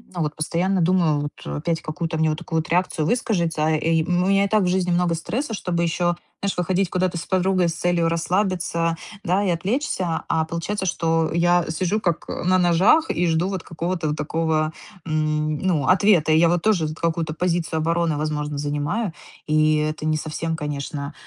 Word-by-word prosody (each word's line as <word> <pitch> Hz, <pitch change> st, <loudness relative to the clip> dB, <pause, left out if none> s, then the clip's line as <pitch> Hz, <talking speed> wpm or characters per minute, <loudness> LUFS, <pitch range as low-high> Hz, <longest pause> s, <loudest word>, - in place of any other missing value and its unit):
ну 175 Hz, -, -2 dB
вот 150 Hz, 0 st, -3 dB
постоянно 175 Hz, +4 st, 0 dB
думаю 165 Hz, -4 st, +2 dB
вот: 145 Hz, -, -7 dB
опять 165 Hz, +1 st, -2 dB
какую-то 160 Hz, +1 st, -3 dB
мне 160 Hz, 0 st, +2 dB
вот 155 Hz, -, -3 dB
такую 160 Hz, -, -2 dB
вот 155 Hz, -, -5 dB
реакцию 170 Hz, -3 st, +1 dB
выскажется. 170 Hz, -10 st, 0 dB
И, 160 Hz, +1 st, +1 dB
м, 175 Hz, +2 st, +1 dB
у -, -, 0 dB
меня 195 Hz, 0 st, +3 dB
и -, -, 0 dB
так 215 Hz, 0 st, +2 dB
в 180 Hz, -, +1 dB
жизни 180 Hz, 0 st, +1 dB
много 175 Hz, -1 st, +2 dB
стресса, 230 Hz, -, -3 dB
чтобы 175 Hz, -4 st, -1 dB
еще, 175 Hz, +1 st, +1 dB, 0.3 s
знаешь, 200 Hz, -2 st, -2 dB
выходить 180 Hz, +1 st, 0 dB
куда-то 180 Hz, -1 st, 0 dB
с 165 Hz, -, -5 dB
подругой 185 Hz, -2 st, +2 dB
с 165 Hz, -, -4 dB
целью 170 Hz, -1 st, +1 dB
расслабиться, 170 Hz, -1 st, 0 dB, 0.3 s
да, 185 Hz, +4 st, +1 dB
и -, -, +1 dB
отвлечься. 185 Hz, -, -1 dB
А 160 Hz, 0 st, +2 dB
получается, 185 Hz, +5 st, -3 dB
что 165 Hz, -1 st, +1 dB
я 175 Hz, 0 st, +3 dB
сижу 185 Hz, +6 st, 0 dB
как 170 Hz, -4 st, -1 dB
на 185 Hz, +1 st, +1 dB
ножах 185 Hz, -, +4 dB
и 175 Hz, +1 st, 0 dB
жду 165 Hz, +2 st, +1 dB
вот 190 Hz, -3 st, -4 dB
какого-то 170 Hz, -1 st, -3 dB
вот 150 Hz, -, -2 dB
такого, 155 Hz, 0 st, 0 dB, 0.3 s
м, 155 Hz, -1 st, 0 dB
ну, 165 Hz, -8 st, 0 dB
ответа. 185 Hz, -4 st, +4 dB
И 155 Hz, -, +5 dB
я 170 Hz, 0 st, +5 dB
вот 175 Hz, -1 st, +1 dB
тоже 185 Hz, -8 st, +2 dB
т 155 Hz, -, -6 dB
какую-то 165 Hz, -2 st, -1 dB
позицию 170 Hz, -1 st, -1 dB
обороны, 165 Hz, -1 st, 0 dB
возможно, 150 Hz, -1 st, -2 dB
занимаю, 145 Hz, +8 st, -2 dB, 0.3 s
и 155 Hz, 0 st, +3 dB
это 155 Hz, 0 st, -2 dB
не 155 Hz, 0 st, +1 dB
совсем, 160 Hz, +2 st, -3 dB
конечно, 145 Hz, -1 st, -4 dB
170 Hz, 190 wpm, -22 LUFS, 155-180 Hz, 0.3 s, И